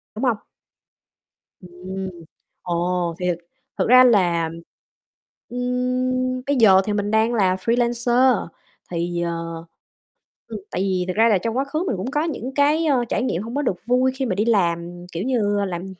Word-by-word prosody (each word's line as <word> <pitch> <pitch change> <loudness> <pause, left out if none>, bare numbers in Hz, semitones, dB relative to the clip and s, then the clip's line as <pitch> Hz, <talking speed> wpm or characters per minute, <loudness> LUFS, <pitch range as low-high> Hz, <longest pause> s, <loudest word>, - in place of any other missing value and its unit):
đúng 220 - -5
hông? 245 -5 +2 1.2
Ừm. 185 +1 -7 0.5
Ồ, 175 0 -1
thì 180 - -1
thực 175 - 0 0.4
thực - - +1
ra 255 +1 +8
là 175 -9 +3 1.0
ừm, 255 +1 -1
bây 285 - +2
giờ 195 -6 +6
thì 210 - -1
mình 205 0 -1
đang 220 +2 +2
là 190 -5 +2
freelancer, 240 +3 +2 0.4
thì, 175 0 -2
ờ 165 -1 -4 0.8
ừm, - - -6
tại - - -2
vì 190 -2 0
thật 185 - -1
ra 225 +2 +5
là 210 - +4
trong 225 +6 -3
quá 270 - +1
khứ 310 +4 -2
mình 220 - -1
cũng 205 +8 -4
có 295 +2 0
những 270 -5 -4
cái, 295 +3 +3
ơ, 265 -6 +2
trải 215 - 0
nghiệm 185 -8 -1
hông 230 +3 -7
có 290 - +1
được 195 -10 -3
vui 250 +2 +2
khi 265 0 -2
mà 200 -7 -1
đi 210 +3 0
làm, 175 -5 0
kiểu 170 +3 -4
như, 205 -5 0
làm 175 0 -5
220 Hz, 175 wpm, -22 LUFS, 180-255 Hz, 1.2 s, ra